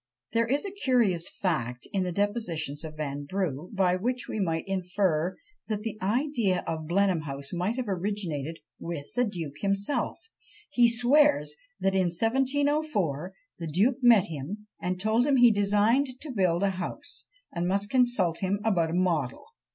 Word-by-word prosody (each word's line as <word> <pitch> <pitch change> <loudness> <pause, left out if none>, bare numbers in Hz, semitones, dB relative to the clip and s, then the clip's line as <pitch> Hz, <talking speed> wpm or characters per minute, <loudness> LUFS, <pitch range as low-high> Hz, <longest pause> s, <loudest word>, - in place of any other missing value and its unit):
There 230 0 +2
is 280 - 0
a 395 - -4
curious 240 - +1
fact 125 -10 -2
in 195 - +1
the 180 -1 -1
depositions 170 -7 -2
of 155 -1 -7
Vanbrugh, 150 +2 -3
by 190 -3 +2
which 245 +6 -2
we - - -4
might 165 -4 -1
infer 185 -2 0 0.3
that 215 -2 -2
the 215 -1 -5
idea 220 -3 +1
of 160 -1 -4
Blenheim 185 -1 +2
House 140 -1 -6
might 180 +6 -1
have 255 -3 -3
originated 175 -6 -2 0.2
with 160 -4 -6
the 245 - +2
duke 165 - -5
himself; 200 +6 -1 0.5
he 240 -4 +5
swears 280 - +4 0.3
that 195 - +1
"in 190 -1 +3
1704, 245 - 0 0.3
the 165 - -4
duke 205 - +2
met 235 -6 +7
him, 170 +6 -6 0.2
and 180 0 -2
told 220 +6 +2
him 280 - +4
he 245 -2 +7
designed 210 +6 +3
to 300 - -7
build 185 -5 +1
a 200 - +3
house, 185 -1 -6 0.3
and 175 0 -1
must 200 +2 0
consult 240 -10 +2
him 195 +1 0
about 180 -7 +2
a - - -4
model, 165 -8 0
&c. - - -38
195 Hz, 165 wpm, -28 LUFS, 170-230 Hz, 0.5 s, met